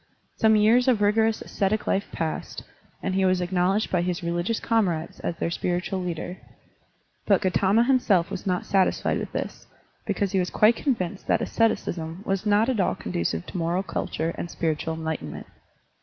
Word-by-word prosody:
Some 220 Hz, -1 st, +4 dB
years 225 Hz, +4 st, +4 dB
of 245 Hz, -5 st, +4 dB
rigorous 220 Hz, +2 st, +2 dB
ascetic 205 Hz, +1 st, -1 dB
life 200 Hz, -, 0 dB
passed, 160 Hz, -1 st, -4 dB, 0.4 s
and 190 Hz, -, -1 dB
he 190 Hz, 0 st, +2 dB
was 185 Hz, -1 st, +3 dB
acknowledged 180 Hz, +3 st, +1 dB
by 180 Hz, -, +2 dB
his 180 Hz, 0 st, -2 dB
religious 175 Hz, +6 st, -1 dB
comrades 180 Hz, -9 st, 0 dB
as 170 Hz, -, -3 dB
their 170 Hz, -, -2 dB
spiritual 180 Hz, +2 st, -1 dB
leader. 175 Hz, +1 st, -4 dB, 0.9 s
But 200 Hz, -3 st, +5 dB
Gautama 195 Hz, +4 st, +3 dB
himself 240 Hz, -9 st, +2 dB
was 185 Hz, -, -5 dB
not 180 Hz, -1 st, 0 dB
satisfied 195 Hz, -2 st, +1 dB
with -, -, -5 dB
this, -, -, -5 dB, 0.4 s
because 200 Hz, -3 st, 0 dB
he 195 Hz, -, +2 dB
was 180 Hz, -, 0 dB
quite 215 Hz, +2 st, +4 dB
convinced 200 Hz, -, -2 dB
that -, -, +3 dB
asceticism 175 Hz, -6 st, -1 dB
was 195 Hz, +2 st, -1 dB
not 210 Hz, +2 st, +4 dB
at 255 Hz, -5 st, 0 dB
all 185 Hz, -, +2 dB
conducive 85 Hz, -1 st, -2 dB
to -, -, -6 dB
moral 170 Hz, +3 st, 0 dB
culture 165 Hz, -3 st, -3 dB
and 175 Hz, -, -4 dB
spiritual 160 Hz, 0 st, -2 dB
enlightenment. 160 Hz, -, -5 dB
185 Hz, 170 wpm, -25 LUFS, 170-210 Hz, 0.9 s, But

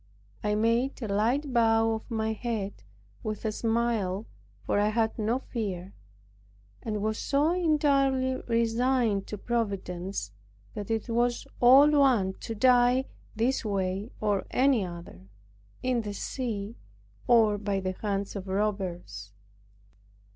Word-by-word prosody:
I 210 Hz, 0 st, +1 dB
made 230 Hz, +5 st, +1 dB
a -, -, -2 dB
light 240 Hz, +8 st, 0 dB
bow 225 Hz, -1 st, +3 dB
of 220 Hz, -, -6 dB
my 220 Hz, -1 st, -1 dB
head, 215 Hz, -3 st, -4 dB, 0.4 s
with 215 Hz, -1 st, -5 dB
a 220 Hz, -, +1 dB
smile, 225 Hz, -3 st, -1 dB, 0.4 s
for -, -, +1 dB
I 205 Hz, -, +3 dB
had 220 Hz, +1 st, 0 dB
no 220 Hz, +3 st, +1 dB
fear, 195 Hz, -8 st, -5 dB, 0.9 s
and 210 Hz, -2 st, -3 dB
was 215 Hz, 0 st, -1 dB
so 290 Hz, +3 st, +2 dB
entirely 275 Hz, -6 st, +2 dB
resigned 230 Hz, -2 st, +1 dB
to 210 Hz, -, -5 dB
Providence, 195 Hz, -, -3 dB, 0.4 s
that 205 Hz, 0 st, -6 dB
it 225 Hz, -1 st, -1 dB
was 240 Hz, +1 st, 0 dB
all 270 Hz, +5 st, +7 dB
one 255 Hz, -10 st, +3 dB
to 225 Hz, -, -5 dB
die 250 Hz, +2 st, +4 dB, 0.3 s
this 235 Hz, +5 st, 0 dB
way 195 Hz, 0 st, -2 dB
or 205 Hz, -2 st, 0 dB
any 260 Hz, -4 st, +3 dB
other; 170 Hz, -, -9 dB, 0.6 s
in 255 Hz, -2 st, +1 dB
the 205 Hz, -2 st, -5 dB
sea, 225 Hz, -4 st, -4 dB, 0.5 s
or 220 Hz, -4 st, +4 dB
by 200 Hz, -1 st, -1 dB
the 185 Hz, 0 st, -2 dB
hands 200 Hz, -1 st, -2 dB
of 195 Hz, -1 st, -6 dB
robbers. 185 Hz, -, -3 dB
220 Hz, 130 wpm, -28 LUFS, 200-245 Hz, 0.9 s, all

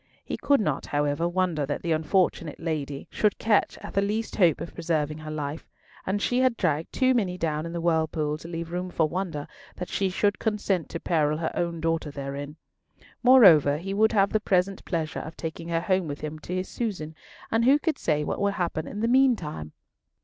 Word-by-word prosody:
He -, -, -3 dB
could 285 Hz, -1 st, +2 dB
not, 150 Hz, -10 st, -1 dB
however, 145 Hz, +3 st, 0 dB
wonder 175 Hz, -4 st, 0 dB
that 145 Hz, +1 st, -3 dB
the 170 Hz, -, -1 dB
unfortunate 160 Hz, -1 st, +1 dB
lady 145 Hz, -4 st, -3 dB
should 210 Hz, -1 st, +1 dB
catch 215 Hz, -2 st, +2 dB
at -, -, -7 dB
the 195 Hz, -, +2 dB
least 215 Hz, +3 st, -2 dB
hope 175 Hz, -6 st, +4 dB
of -, -, -7 dB
preserving 155 Hz, -2 st, -1 dB
her 155 Hz, 0 st, -8 dB
life; 150 Hz, 0 st, -5 dB, 0.4 s
and 195 Hz, +2 st, 0 dB
she 245 Hz, +4 st, +1 dB
had 255 Hz, -2 st, +2 dB
dragged 155 Hz, +1 st, 0 dB
too 260 Hz, -1 st, +3 dB
many 190 Hz, -7 st, 0 dB
down 155 Hz, -1 st, -1 dB
in -, -, -6 dB
the 170 Hz, -, -3 dB
whirlpool 160 Hz, -2 st, 0 dB
to 165 Hz, -, -10 dB
leave 165 Hz, 0 st, -5 dB
room 180 Hz, +1 st, -3 dB
for 165 Hz, -3 st, +1 dB
wonder 170 Hz, -4 st, -3 dB, 0.3 s
that 180 Hz, -, -6 dB
she 195 Hz, -1 st, 0 dB
should 205 Hz, +2 st, +1 dB
consent 205 Hz, -5 st, -1 dB
to 165 Hz, -, -5 dB
peril 155 Hz, -3 st, +1 dB
her 160 Hz, 0 st, -2 dB
own 170 Hz, -1 st, -2 dB
daughter 165 Hz, -1 st, 0 dB
therein. 140 Hz, +1 st, -6 dB, 0.7 s
Moreover, 185 Hz, -, +7 dB
he 195 Hz, +5 st, -4 dB
would 220 Hz, +2 st, +3 dB
have 200 Hz, -2 st, +3 dB
the 215 Hz, -, +2 dB
present 190 Hz, -1 st, 0 dB
pleasure 160 Hz, -4 st, -2 dB
of 160 Hz, -, -8 dB
taking 165 Hz, 0 st, -5 dB
her 165 Hz, -1 st, 0 dB
home 185 Hz, -1 st, +1 dB
with 145 Hz, -1 st, -5 dB
him 155 Hz, 0 st, -5 dB
to 180 Hz, +4 st, -5 dB
his 185 Hz, 0 st, -2 dB
Susan, 185 Hz, -10 st, -4 dB, 0.4 s
and 225 Hz, +1 st, +2 dB
who 275 Hz, +3 st, +6 dB
could 310 Hz, -1 st, -1 dB
say 150 Hz, -1 st, +1 dB
what -, -, -3 dB
would 200 Hz, 0 st, +1 dB
happen 170 Hz, -4 st, -2 dB
in 205 Hz, -, -5 dB
the 230 Hz, -, +2 dB
meantime? 230 Hz, -, +2 dB
170 Hz, 210 wpm, -26 LUFS, 155-200 Hz, 0.7 s, Moreover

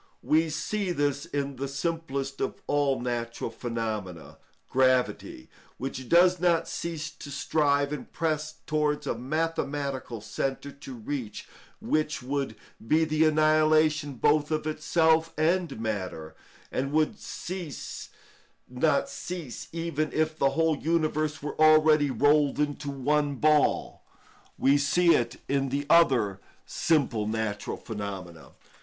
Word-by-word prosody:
We 160 Hz, +1 st, +3 dB
see 185 Hz, +5 st, -2 dB
this 145 Hz, -3 st, -1 dB
in 140 Hz, -2 st, -3 dB
the 140 Hz, +2 st, -3 dB
simplest 140 Hz, -2 st, -3 dB
of -, -, -2 dB
all 145 Hz, -2 st, +1 dB
natural 120 Hz, -1 st, -3 dB
phenomena, 105 Hz, -, -5 dB, 0.3 s
gravity, 130 Hz, -, +1 dB, 0.3 s
which 130 Hz, -1 st, -5 dB
does 180 Hz, +1 st, +5 dB
not 170 Hz, -2 st, +2 dB
cease 155 Hz, -2 st, -4 dB
to 145 Hz, -, -11 dB
strive 145 Hz, 0 st, +1 dB
and 150 Hz, -, -7 dB
press 155 Hz, -1 st, -2 dB
towards 150 Hz, -1 st, 0 dB
a -, -, 0 dB
mathematical 140 Hz, -2 st, -2 dB
centre 135 Hz, +6 st, -3 dB
to 140 Hz, -2 st, -10 dB
reach 120 Hz, 0 st, -5 dB, 0.3 s
which 155 Hz, -2 st, -1 dB
would 135 Hz, -3 st, -2 dB, 0.3 s
be 160 Hz, +5 st, +4 dB
the 155 Hz, 0 st, +2 dB
annihilation 155 Hz, -1 st, +3 dB
both 150 Hz, +4 st, +2 dB
of 155 Hz, -1 st, -1 dB
itself 160 Hz, +1 st, +2 dB
and 165 Hz, -4 st, +1 dB
matter, 95 Hz, -8 st, -4 dB, 0.4 s
and 135 Hz, +1 st, -2 dB
would 155 Hz, +7 st, +2 dB, 1.5 s
not 140 Hz, +4 st, +1 dB
cease 170 Hz, -9 st, -6 dB
even 165 Hz, -2 st, -2 dB
if 155 Hz, 0 st, 0 dB
the 140 Hz, -, +2 dB
whole 160 Hz, +1 st, +1 dB
universe 155 Hz, -2 st, 0 dB
were 150 Hz, +1 st, -4 dB
already 155 Hz, -1 st, +6 dB
rolled 145 Hz, +3 st, +3 dB
into 145 Hz, -1 st, -1 dB
one 145 Hz, +1 st, 0 dB
ball. 150 Hz, +2 st, +2 dB, 0.6 s
We 140 Hz, +2 st, +4 dB
see 170 Hz, +4 st, +4 dB
it 120 Hz, +1 st, 0 dB
in 135 Hz, 0 st, 0 dB
the 140 Hz, +2 st, -2 dB
other 120 Hz, -, +4 dB, 0.3 s
simple 130 Hz, -10 st, +1 dB
natural 110 Hz, -1 st, -3 dB
phenomena. 95 Hz, -6 st, -7 dB
145 Hz, 125 wpm, -27 LUFS, 130-155 Hz, 1.5 s, already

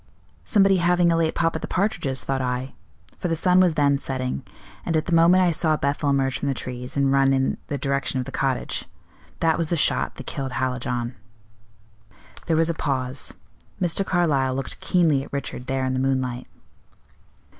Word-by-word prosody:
'Somebody 195 Hz, -2 st, +4 dB
having 175 Hz, 0 st, +3 dB
a -, -, +3 dB
late 165 Hz, -1 st, +1 dB
pop 165 Hz, -1 st, +1 dB
at -, -, -3 dB
the -, -, -4 dB
partridges,' 140 Hz, -, -1 dB
thought 135 Hz, +2 st, -1 dB
I; 125 Hz, +1 st, -3 dB, 0.5 s
for -, -, -2 dB
the 165 Hz, -, 0 dB
sun 180 Hz, +3 st, +4 dB
was 180 Hz, -4 st, +4 dB
then 140 Hz, -1 st, +3 dB
setting, 130 Hz, -, -3 dB, 0.4 s
and 165 Hz, -, 0 dB
at 155 Hz, -, -1 dB
the 175 Hz, -, -2 dB
moment 170 Hz, +3 st, +5 dB
I 175 Hz, -, +3 dB
saw 155 Hz, -1 st, +1 dB
Bethel 145 Hz, +1 st, 0 dB
emerge 135 Hz, -1 st, +1 dB
from 145 Hz, -, -3 dB
the 135 Hz, -, 0 dB
trees, 125 Hz, +2 st, -6 dB
and 140 Hz, -1 st, +2 dB
run 135 Hz, 0 st, +4 dB
in 135 Hz, 0 st, +1 dB
the 145 Hz, -, -3 dB
direction 140 Hz, 0 st, -1 dB
of 125 Hz, -, -3 dB
the -, -, -7 dB
cottage. 135 Hz, -2 st, -1 dB, 0.6 s
That 165 Hz, 0 st, +2 dB
was 165 Hz, -2 st, 0 dB
the 170 Hz, -, +1 dB
shot -, -, +1 dB
that 135 Hz, -, -9 dB
killed 135 Hz, -2 st, -4 dB
Hallijohn." 125 Hz, -1 st, -2 dB, 1.3 s
There 165 Hz, -2 st, +2 dB
was 165 Hz, +1 st, +3 dB
a -, -, -3 dB
pause. 130 Hz, -4 st, -2 dB, 0.4 s
Mr. 180 Hz, +2 st, +1 dB
Carlyle 145 Hz, -9 st, +1 dB
looked 135 Hz, 0 st, -4 dB
keenly 165 Hz, -6 st, +2 dB
at -, -, -12 dB
Richard 140 Hz, -2 st, -5 dB
there 135 Hz, 0 st, -1 dB
in 130 Hz, -, -1 dB
the 130 Hz, -, -1 dB
moonlight. 130 Hz, -2 st, -1 dB
140 Hz, 190 wpm, -23 LUFS, 130-165 Hz, 1.3 s, moment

